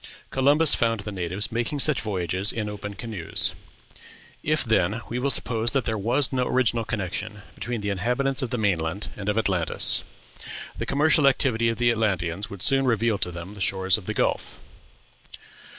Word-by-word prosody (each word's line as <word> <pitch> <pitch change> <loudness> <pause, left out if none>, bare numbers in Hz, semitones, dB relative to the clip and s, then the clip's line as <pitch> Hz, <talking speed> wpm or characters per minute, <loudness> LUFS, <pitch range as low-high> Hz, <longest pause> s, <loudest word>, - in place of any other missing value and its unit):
Columbus 145 +4 +4
found 115 -2 +1
the 105 - -6
natives 95 +4 -4
making 120 +5 -2
such 140 -2 +3
voyages 95 -1 +1
in 110 -2 -4
open 105 0 -7
canoes. 105 -6 +1 0.9
If, 155 +1 0
then, 110 -1 0
we 120 - -3
will 140 +2 0
suppose 115 -2 +2
that 135 -2 0
there 110 - -1
was 120 +7 +1
no 125 -1 0
original 120 -2 +1
connection 105 -1 -5
between 120 -2 -4
the 105 - -3
inhabitants 125 +8 +1
of 130 - -3
the 125 - -2
main 100 -6 +1
land 80 +6 -4
and 105 0 -4
of 105 - -1
Atlantis, 95 -7 +2 0.7
the - - -5
commercial 145 +1 +3
activity 120 -4 +2
of 115 - -3
the 120 -1 +3
Atlanteans 100 -4 -1
would 100 -2 -7
soon 135 -1 +4
reveal 115 -3 +1
to - - -1
them 85 +3 -8
the 100 - -10
shores 95 -1 +2
of 105 -4 -7
the - - -3
Gulf. - - -1
110 Hz, 180 wpm, -24 LUFS, 100-125 Hz, 0.9 s, Columbus